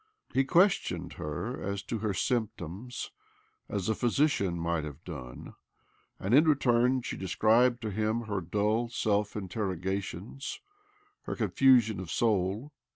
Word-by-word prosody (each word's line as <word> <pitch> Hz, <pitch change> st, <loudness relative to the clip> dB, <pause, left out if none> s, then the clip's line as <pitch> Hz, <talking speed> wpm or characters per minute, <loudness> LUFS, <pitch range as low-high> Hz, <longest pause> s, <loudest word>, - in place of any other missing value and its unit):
He 135 Hz, -, +4 dB
ques 180 Hz, +6 st, +5 dB
tioned -, -, -5 dB
her 90 Hz, -, -4 dB
as 100 Hz, 0 st, -3 dB
to 115 Hz, +3 st, -3 dB
her 105 Hz, -2 st, -1 dB
symptoms 115 Hz, -1 st, -3 dB, 0.6 s
as 100 Hz, -3 st, -2 dB
a 110 Hz, -, +2 dB
physician 120 Hz, -, +1 dB
might 85 Hz, -1 st, -1 dB
have 75 Hz, +1 st, -8 dB
done, 65 Hz, -8 st, -8 dB, 0.7 s
and, 100 Hz, +5 st, -1 dB
in 150 Hz, +5 st, +6 dB
return, 125 Hz, -3 st, +3 dB
she -, -, -4 dB
de 95 Hz, -, -5 dB
scribed 120 Hz, +5 st, +3 dB
to 110 Hz, -, -2 dB
him 110 Hz, +3 st, 0 dB
her 100 Hz, -4 st, -3 dB
dull 105 Hz, +6 st, 0 dB
self 105 Hz, -3 st, 0 dB
interrogations, 95 Hz, +3 st, -4 dB, 0.7 s
her -, -, -3 dB
confusion 120 Hz, -7 st, +4 dB
of 95 Hz, -3 st, -6 dB
soul. 105 Hz, -, 0 dB
105 Hz, 140 wpm, -30 LUFS, 95-120 Hz, 0.7 s, in